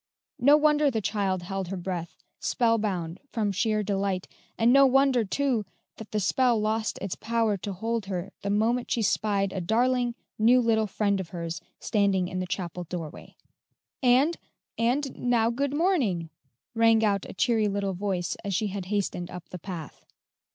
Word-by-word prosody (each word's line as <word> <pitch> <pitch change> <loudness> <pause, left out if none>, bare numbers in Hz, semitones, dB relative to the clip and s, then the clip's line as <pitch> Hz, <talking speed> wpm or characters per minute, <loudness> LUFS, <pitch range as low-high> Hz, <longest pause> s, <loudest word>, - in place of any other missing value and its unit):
No 285 +4 +6
wonder 300 -1 +4
the 230 -4 -1
child 195 -3 -1
held 195 0 -4
her 195 +2 -4
breath, 175 -2 -4 0.2
spellbound 210 -8 0
from 215 -4 -1
sheer 215 +2 0
delight, 195 -2 -1 0.3
and 230 +2 +4
no 275 0 +7
wonder, 265 -2 +4
too, 245 +1 0 0.3
that 220 - -9
the 215 - -1
spell 240 +4 +2
lost 215 +1 -1
its 195 -2 -4
power 225 -2 0
to 200 +2 -5
hold 220 +2 -3
her 190 0 -4
the 200 - -3
moment 225 +4 +1
she 230 - +1
spied 200 -1 +1
a 190 - -3
darling, 240 +5 +1 0.2
new 240 +4 +6
little 225 -2 +2
friend 200 0 0
of 180 -3 -5
hers 170 -2 -5 0.2
standing 200 -4 +1
in 185 +1 -4
the 185 - -3
chapel 180 -1 -4
doorway. 165 -2 -7 0.7
"And 265 +6 +4 0.4
and 255 +4 0
now 235 -2 +2
good 275 +3 -1
morning," 250 - +1 0.4
rang 225 -1 +4
out 200 -2 0
a - - -7
cheery 220 +1 +2
little 200 -1 -1
voice 185 -2 -2
as 200 -2 -2
she 210 +1 0
had 195 -1 -5
hastened 190 -3 -2
up 180 -1 -9
the 180 - -7
path. 165 -4 -8
210 Hz, 170 wpm, -27 LUFS, 190-235 Hz, 0.7 s, no